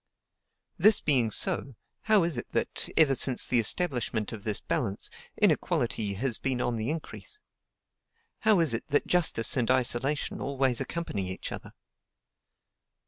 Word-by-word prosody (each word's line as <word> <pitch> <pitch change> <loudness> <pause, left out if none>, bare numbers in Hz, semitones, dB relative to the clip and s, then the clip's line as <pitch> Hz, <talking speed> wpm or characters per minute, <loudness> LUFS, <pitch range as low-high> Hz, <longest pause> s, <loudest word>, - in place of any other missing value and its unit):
This 215 -1 +6
being 130 -7 +2
so, 130 +4 +1 0.3
how 215 -4 +4
is 165 -3 +1
it 120 - -4
that, - - -2
ever 155 -4 +4
since 130 0 +4
the 125 - +2
establishment 120 - +1
of 110 -3 -9
this 105 -2 0
balance, 110 -11 -2 0.3
inequality 100 -2 0
has 120 +2 -2
been 130 -2 -2
on 120 -1 -2
the 110 +1 -3
increase? 165 - -7 1.0
How 215 -4 +3
is 155 -7 +1
it 115 - -4
that 145 - 0
justice 165 -10 +2
and 120 -3 -1
isolation 130 +3 -1
always 135 -3 0
accompany 105 - -4
each 95 - -7
other? - - -9
130 Hz, 140 wpm, -27 LUFS, 115-155 Hz, 1.0 s, This